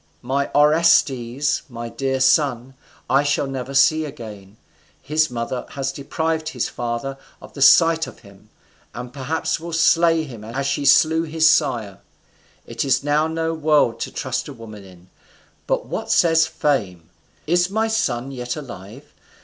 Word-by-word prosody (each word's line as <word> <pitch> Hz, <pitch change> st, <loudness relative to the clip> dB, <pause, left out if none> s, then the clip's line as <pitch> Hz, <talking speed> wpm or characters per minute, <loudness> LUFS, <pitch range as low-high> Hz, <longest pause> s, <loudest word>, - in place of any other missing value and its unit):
My 140 Hz, +3 st, -1 dB
Orestes, 145 Hz, -3 st, +3 dB
my 120 Hz, -1 st, -7 dB
dear 135 Hz, +2 st, -2 dB
son, 130 Hz, -1 st, +2 dB, 0.3 s
I 140 Hz, -, +3 dB
shall 145 Hz, 0 st, 0 dB
never 135 Hz, 0 st, -5 dB
see 150 Hz, +4 st, +4 dB
again. 110 Hz, -8 st, -10 dB, 0.4 s
His 155 Hz, +1 st, 0 dB
mother 120 Hz, +1 st, -4 dB
has 135 Hz, -1 st, -2 dB
deprived 160 Hz, +3 st, -3 dB
his 125 Hz, -, -2 dB
father 120 Hz, +3 st, -4 dB, 0.2 s
of -, -, -14 dB
the 140 Hz, -, -8 dB
sight 165 Hz, +3 st, +5 dB
of -, -, -13 dB
him, 100 Hz, -1 st, -18 dB, 0.5 s
and 125 Hz, 0 st, -7 dB
perhaps 145 Hz, +5 st, -2 dB
will 170 Hz, +1 st, -8 dB
slay 165 Hz, 0 st, +3 dB
him 120 Hz, -8 st, -10 dB
as 125 Hz, +5 st, -4 dB
she 140 Hz, +1 st, -1 dB
slew 160 Hz, +4 st, +5 dB
his 160 Hz, 0 st, +2 dB
sire. 120 Hz, -, +1 dB, 0.7 s
It -, -, -4 dB
is 135 Hz, 0 st, +1 dB
now 150 Hz, +2 st, +1 dB
no 160 Hz, 0 st, -2 dB
world 150 Hz, -6 st, +2 dB
to -, -, -4 dB
trust -, -, -3 dB
a -, -, -8 dB
woman 110 Hz, -3 st, -11 dB
in. 90 Hz, -1 st, -17 dB, 0.6 s
But -, -, -1 dB
what -, -, -5 dB
says 160 Hz, -1 st, +4 dB
fame? 90 Hz, -, -2 dB, 0.3 s
is 175 Hz, +3 st, +2 dB
my 220 Hz, +3 st, 0 dB
son 135 Hz, -, -1 dB
yet 125 Hz, -2 st, -5 dB
alive? 120 Hz, -3 st, -10 dB
135 Hz, 155 wpm, -21 LUFS, 120-155 Hz, 0.7 s, sight